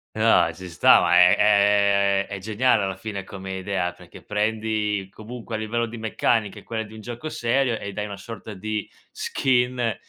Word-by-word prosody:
Eh - - -6
no, 115 -7 +4
ci 90 +2 -10
sta, 80 - +6
ma 90 0 +3
è 90 0 +7
è 100 -1 +3
è 100 -1 -6
geniale 110 +2 +1
alla 95 -1 -2
fine 100 -1 -6
come 95 0 -7
idea, 95 -2 -2
perché - - -15
prendi 105 -2 -1
comunque 115 +1 -8
a - - -1
livello 115 +2 -1
di 115 0 -8
meccanica, 110 -1 0
è - - -17
quella 110 -1 -4
di 105 +1 -13
un 110 - -10
gioco 120 +7 -6
serio 120 -1 0
e 100 - -6
dai 105 +1 -3
una 100 -1 -7
sorta 110 +1 -9
di 105 +2 -4 0.2
skin 125 -3 0
105 Hz, 190 wpm, -24 LUFS, 100-115 Hz, 0.2 s, è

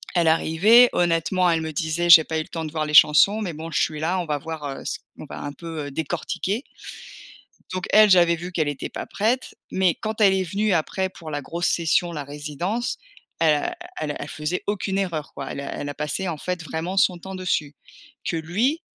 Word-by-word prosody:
elle 170 -2 +3
arrivait. 200 +10 +5
Honnêtement 175 +2 +2
elle 165 -1 +1
me 160 0 -4
disait: 160 +3 -1
«J'ai 165 -1 +10
pas 160 +1 -2
eu - - 0
le - - -8
temps 165 -1 -5
de 155 - -6
voir 155 -1 -2
les 150 - -1
chansons, 195 +8 +7
mais 180 -6 -3
bon 160 +2 -7
je 155 - 0
suis 155 -1 -1
là 170 +4 0
on 175 - -2
va 150 -2 -2
voir, 160 0 -6
heu, 135 -1 -6
c - - -3 0.2
on - - -8
va - - -7
un 145 0 -5
peu, 165 -3 -6
heu, - - -8
décortiquer». 175 - -3 1.1
Donc 185 -1 -3
elle 215 -1 +7
j'avais 175 -2 +5
vu 175 +2 -7
qu'elle 160 -4 0
était 145 -2 -4
pas - - -6
prête, 235 +5 -1 0.2
mais 185 -3 +2
quand 220 +1 -4
elle 195 -2 +6
est 190 - +1
venue 200 +3 0
après 185 +3 0
pour 160 -4 -10
la 145 0 -3
grosse 170 +5 -2
session, 170 +1 +1
la 150 -3 -5
résidence. 150 - -4 0.4
Elle 160 -2 +4
a - - -3 0.2
elle 150 - -2
a - - -6
elle 145 - -6
faisait 155 +4 -3
aucune 195 -1 -1
erreur 170 -7 -3
quoi. - - -6
Elle - - -6
a 140 - -6
elle 145 - -5
a - - -4
passé 150 +6 -3
en 165 - -3
fait 180 +2 -4
vraiment 165 +4 -4
son 185 -2 +3
temps 190 +3 -8
dessus. 170 -6 -1 0.5
Que 165 - -1
lui 215 - 0
170 Hz, 230 wpm, -23 LUFS, 155-190 Hz, 1.1 s, J'ai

